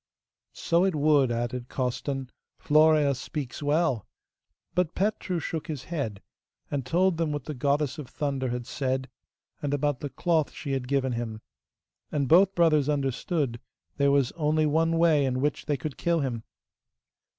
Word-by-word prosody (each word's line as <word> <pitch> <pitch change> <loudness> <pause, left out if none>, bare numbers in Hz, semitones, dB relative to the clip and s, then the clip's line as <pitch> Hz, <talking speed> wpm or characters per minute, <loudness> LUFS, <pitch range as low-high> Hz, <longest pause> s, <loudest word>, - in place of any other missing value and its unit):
'So 170 +1 +1
it 190 -3 +1
would,' 145 -4 +3
added 120 +1 -3
Costan. 130 +1 -3 0.3
'Florea 155 -1 +4
speaks 135 0 -5
well.' 145 - +1 0.7
But 180 -2 0
Petru 195 -2 -1
shook 160 0 -4
his 150 -6 -5
head, 110 -11 -3 0.5
and 140 -2 -1
told 180 +4 +2
them 165 -2 0
what 145 -3 -3
the 150 - -5
Goddess 145 +3 0
of 145 - -6
Thunder 140 -3 -2
had 120 0 -3
said, 130 +1 -2 0.5
and 145 -1 0
about 145 -2 0
the 145 - -4
cloth 160 0 0
she 140 - -5
had 135 -2 -2
given 135 -1 +1
him. 115 -2 -4 0.7
And 140 -3 0
both 190 +6 +5
brothers 155 -4 +3
understood 140 -2 -1 0.4
there 140 -1 +3
was 140 -3 +3
only 155 -1 +1
one 165 +2 +2
way 165 -3 +4
in 130 -1 0
which 145 +2 -1
they 145 - +1
could 140 +2 -5
kill 170 -2 +1
him. 120 -5 -3
145 Hz, 160 wpm, -27 LUFS, 130-160 Hz, 0.7 s, both